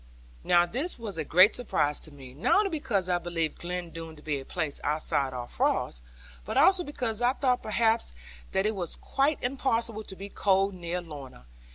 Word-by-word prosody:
Now 175 Hz, 0 st, +5 dB
this 270 Hz, -, -2 dB
was 215 Hz, -8 st, -6 dB
a -, -, 0 dB
great 185 Hz, +8 st, +6 dB
surprise 150 Hz, -11 st, 0 dB
to 155 Hz, -, -7 dB
me; 135 Hz, -3 st, -12 dB
not 145 Hz, -, +2 dB
only -, -, 0 dB
because 235 Hz, -, -1 dB
I 175 Hz, -1 st, +2 dB
believed 165 Hz, -2 st, -2 dB
Glen 175 Hz, -1 st, -4 dB
Doone 165 Hz, -1 st, -7 dB
to 150 Hz, -, -16 dB
be 150 Hz, -2 st, -1 dB
a 135 Hz, -, -9 dB
place 150 Hz, -3 st, -3 dB
outside 145 Hz, -2 st, 0 dB
all 125 Hz, -1 st, -5 dB
frost, -, -, 0 dB, 0.4 s
but -, -, -3 dB
also 375 Hz, -2 st, +6 dB
because 245 Hz, -7 st, -3 dB
I 245 Hz, +1 st, +4 dB
thought 255 Hz, -3 st, +1 dB
perhaps 225 Hz, +1 st, +1 dB, 0.4 s
that 190 Hz, +1 st, +1 dB
it 215 Hz, -, +2 dB
was 180 Hz, -5 st, -4 dB
quite 280 Hz, +2 st, +1 dB
impossible 235 Hz, -4 st, 0 dB
to 200 Hz, -3 st, -10 dB
be 195 Hz, +1 st, -7 dB
cold 195 Hz, 0 st, +2 dB
near 175 Hz, 0 st, -3 dB
Lorna. 140 Hz, -, -10 dB
185 Hz, 195 wpm, -28 LUFS, 155-230 Hz, 0.4 s, great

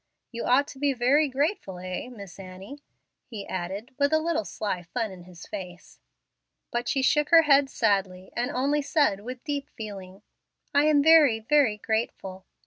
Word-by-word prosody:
You 235 Hz, -1 st, -5 dB
ought 270 Hz, +3 st, +3 dB
to 265 Hz, -, -11 dB
be 285 Hz, -1 st, +1 dB
very 270 Hz, +5 st, +3 dB
grateful, 270 Hz, -, -2 dB
eh, 185 Hz, +6 st, -6 dB
Miss 200 Hz, -6 st, -11 dB
Annie?" 195 Hz, +9 st, -10 dB, 0.5 s
he 215 Hz, -5 st, -7 dB
added, 190 Hz, +7 st, -5 dB
with 285 Hz, +1 st, +2 dB
a 315 Hz, -, +4 dB
little 315 Hz, -8 st, -1 dB
sly 195 Hz, -4 st, -3 dB
fun 215 Hz, +5 st, -4 dB
in 180 Hz, -2 st, -12 dB
his 180 Hz, -1 st, -13 dB
face. 180 Hz, -4 st, -9 dB, 0.7 s
But 240 Hz, 0 st, -2 dB
she 270 Hz, -2 st, 0 dB
shook 295 Hz, +3 st, +2 dB
her 330 Hz, -1 st, +7 dB
head 280 Hz, -2 st, +4 dB
sadly, 195 Hz, -6 st, -1 dB
and 245 Hz, +1 st, -1 dB
only 280 Hz, +4 st, 0 dB
said 285 Hz, -, +1 dB
with 250 Hz, +4 st, -8 dB
deep 290 Hz, -2 st, -4 dB
feeling, 195 Hz, -2 st, -9 dB, 0.5 s
"I 285 Hz, +1 st, +4 dB
am 300 Hz, -2 st, +4 dB
very, 310 Hz, -7 st, +6 dB
very 240 Hz, -2 st, +2 dB
grateful." 195 Hz, -4 st, -3 dB
240 Hz, 170 wpm, -26 LUFS, 195-285 Hz, 0.7 s, her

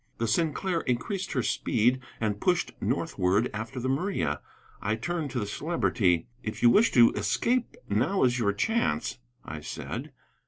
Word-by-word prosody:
The 115 Hz, -, -1 dB
Sinclair 165 Hz, -, +1 dB
increased 170 Hz, -, -2 dB
her 125 Hz, -4 st, 0 dB
speed 125 Hz, +5 st, +2 dB, 0.2 s
and 105 Hz, -2 st, -1 dB
pushed 180 Hz, -2 st, +1 dB
northward 105 Hz, -, +1 dB
after 110 Hz, +5 st, -5 dB
the 125 Hz, -, -2 dB
Maria. 135 Hz, -, -1 dB, 0.4 s
I 105 Hz, +2 st, 0 dB
turned 160 Hz, +6 st, -3 dB
to 125 Hz, -, -2 dB
the 105 Hz, -, -2 dB
Celebrity. 100 Hz, -, +1 dB, 0.2 s
"If 110 Hz, -, -5 dB
you 120 Hz, -, +8 dB
wish 220 Hz, -, +5 dB
to 120 Hz, -2 st, +7 dB
escape, 245 Hz, 0 st, 0 dB
now 125 Hz, -, +1 dB
is 125 Hz, -1 st, +3 dB
your 100 Hz, -3 st, +2 dB
chance," 100 Hz, -, 0 dB, 0.3 s
I -, -, -6 dB
said. -, -, -6 dB
125 Hz, 155 wpm, -28 LUFS, 105-170 Hz, 0.4 s, you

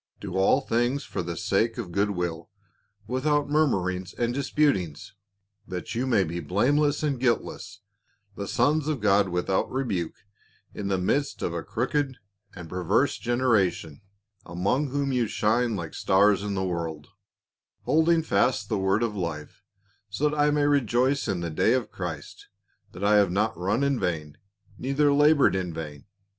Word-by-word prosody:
Do 95 Hz, -3 st, -6 dB
all 95 Hz, +8 st, +3 dB
things 120 Hz, +3 st, 0 dB
for -, -, -4 dB
the 85 Hz, -1 st, -5 dB
sake 110 Hz, +4 st, 0 dB
of 105 Hz, -8 st, -5 dB
goodwill, 90 Hz, -4 st, -2 dB, 0.6 s
without 145 Hz, +5 st, 0 dB
murmurings 95 Hz, -, 0 dB
and 120 Hz, 0 st, -1 dB
disputings, 135 Hz, -, 0 dB, 0.5 s
that 90 Hz, -1 st, -5 dB
you 125 Hz, +3 st, -1 dB
may 110 Hz, -6 st, +3 dB
be 85 Hz, 0 st, -4 dB
blameless 140 Hz, -, +1 dB
and 140 Hz, -4 st, 0 dB
guiltless, 110 Hz, -4 st, -2 dB, 0.5 s
the 100 Hz, -, -5 dB
sons 145 Hz, +7 st, +1 dB
of 155 Hz, -3 st, -1 dB
God 100 Hz, -1 st, +3 dB
without 90 Hz, +2 st, -1 dB
rebuke 105 Hz, -11 st, -2 dB, 0.6 s
in 100 Hz, -, -5 dB
the 95 Hz, -1 st, +1 dB
midst 135 Hz, +10 st, -1 dB
of 85 Hz, -, -1 dB
a 85 Hz, -, -3 dB
crooked 130 Hz, -, -2 dB, 0.4 s
and 90 Hz, -2 st, -8 dB
perverse 90 Hz, -, 0 dB
gener 120 Hz, 0 st, +1 dB
ation, 85 Hz, -2 st, -4 dB, 0.4 s
among 100 Hz, -, -1 dB
whom 140 Hz, 0 st, -1 dB
ye 120 Hz, -3 st, +1 dB
shine 115 Hz, +3 st, +1 dB
like 85 Hz, -4 st, -5 dB
stars 100 Hz, +1 st, +3 dB
in 100 Hz, -1 st, -3 dB
the 95 Hz, 0 st, -1 dB
world; 80 Hz, -4 st, -4 dB, 0.7 s
holding 160 Hz, +1 st, +3 dB
fast 105 Hz, -3 st, +1 dB
the 105 Hz, -, 0 dB
word 95 Hz, +4 st, +1 dB
of 110 Hz, -3 st, -2 dB
life, 85 Hz, -5 st, -5 dB, 0.5 s
so 150 Hz, +1 st, 0 dB
that 150 Hz, -, -4 dB
I 150 Hz, 0 st, +3 dB
may 150 Hz, 0 st, +1 dB
rejoice 135 Hz, -1 st, +2 dB
in 90 Hz, -, -1 dB
the 85 Hz, -1 st, -3 dB
day 110 Hz, +8 st, +2 dB
of 130 Hz, -3 st, -1 dB
Christ, 85 Hz, -5 st, -7 dB, 0.5 s
that: 90 Hz, -, -8 dB
I 105 Hz, +1 st, +5 dB
have 100 Hz, -3 st, +4 dB
not 105 Hz, +3 st, 0 dB
run 95 Hz, +10 st, 0 dB
in 140 Hz, -3 st, +1 dB
vain 75 Hz, -4 st, -3 dB, 0.4 s
neither 140 Hz, +2 st, +2 dB
labored 145 Hz, -4 st, +4 dB
in 90 Hz, -2 st, -2 dB
vain. 75 Hz, -3 st, -7 dB
105 Hz, 160 wpm, -26 LUFS, 90-135 Hz, 0.7 s, I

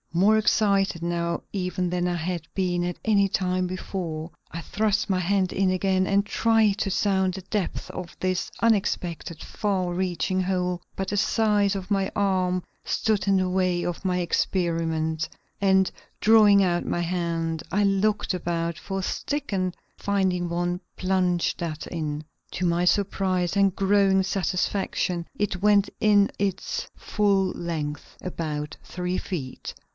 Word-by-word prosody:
More 200 Hz, +6 st, +5 dB
excited 200 Hz, -5 st, +2 dB
now 170 Hz, 0 st, -1 dB
even 180 Hz, -2 st, -1 dB
than 180 Hz, 0 st, 0 dB
I 175 Hz, -, 0 dB
had 175 Hz, +1 st, -2 dB
been 180 Hz, -2 st, 0 dB
at 175 Hz, 0 st, -3 dB
any 200 Hz, -3 st, +4 dB
time 185 Hz, -1 st, 0 dB
before, 175 Hz, -3 st, -4 dB, 0.2 s
I 165 Hz, -, -5 dB
thrust 210 Hz, +5 st, 0 dB
my 185 Hz, -, +2 dB
hand 185 Hz, +1 st, +1 dB
in 195 Hz, -1 st, +2 dB
again 185 Hz, 0 st, +2 dB
and 200 Hz, +1 st, +2 dB
tried 220 Hz, -2 st, +2 dB
to 195 Hz, -, 0 dB
sound 190 Hz, -1 st, +1 dB
the 190 Hz, -, -7 dB
depth 195 Hz, 0 st, -3 dB
of 180 Hz, -2 st, -7 dB
this 185 Hz, 0 st, -1 dB
unexpected 180 Hz, -7 st, 0 dB
far 190 Hz, -4 st, -1 dB
reaching 185 Hz, +1 st, 0 dB
hole; 180 Hz, -1 st, -1 dB
but 195 Hz, 0 st, -3 dB
the 205 Hz, -, -1 dB
size 205 Hz, -1 st, +2 dB
of 195 Hz, +1 st, -6 dB
my 195 Hz, -1 st, +1 dB
arm 185 Hz, -2 st, +1 dB, 0.2 s
stood 205 Hz, -3 st, 0 dB
in 195 Hz, -1 st, +4 dB
the 185 Hz, -1 st, +1 dB
way 180 Hz, -1 st, +1 dB
of 175 Hz, +1 st, -3 dB
my 180 Hz, -1 st, +1 dB
experiment, 165 Hz, -3 st, 0 dB, 0.3 s
and, 190 Hz, -1 st, +4 dB, 0.3 s
drawing 210 Hz, -2 st, +6 dB
out 175 Hz, -2 st, +1 dB
my -, -, -1 dB
hand, 165 Hz, -2 st, -1 dB
I 205 Hz, +2 st, +2 dB
looked 200 Hz, +1 st, +1 dB
about 170 Hz, -2 st, -2 dB
for 195 Hz, -1 st, -4 dB
a -, -, -4 dB
stick 285 Hz, +4 st, -3 dB
and 185 Hz, -2 st, -1 dB, 0.2 s
finding 190 Hz, -3 st, 0 dB
one, 175 Hz, +1 st, -1 dB, 0.2 s
plunged 185 Hz, -2 st, +1 dB
that 160 Hz, -2 st, -4 dB
in. 155 Hz, -2 st, -4 dB, 0.3 s
To 180 Hz, -, -1 dB
my 170 Hz, 0 st, +2 dB
surprise 185 Hz, -1 st, +1 dB
and 195 Hz, -2 st, +4 dB
growing 195 Hz, 0 st, +3 dB
satisfaction 185 Hz, -2 st, -1 dB
it 195 Hz, -3 st, -1 dB
went 205 Hz, -1 st, +4 dB
in 205 Hz, -2 st, +5 dB
its 195 Hz, -1 st, -2 dB
full 200 Hz, -3 st, +1 dB
length 150 Hz, -4 st, -5 dB
about 150 Hz, -4 st, -4 dB
three 180 Hz, 0 st, -3 dB
feet. 145 Hz, -9 st, -5 dB
185 Hz, 150 wpm, -25 LUFS, 175-195 Hz, 0.3 s, drawing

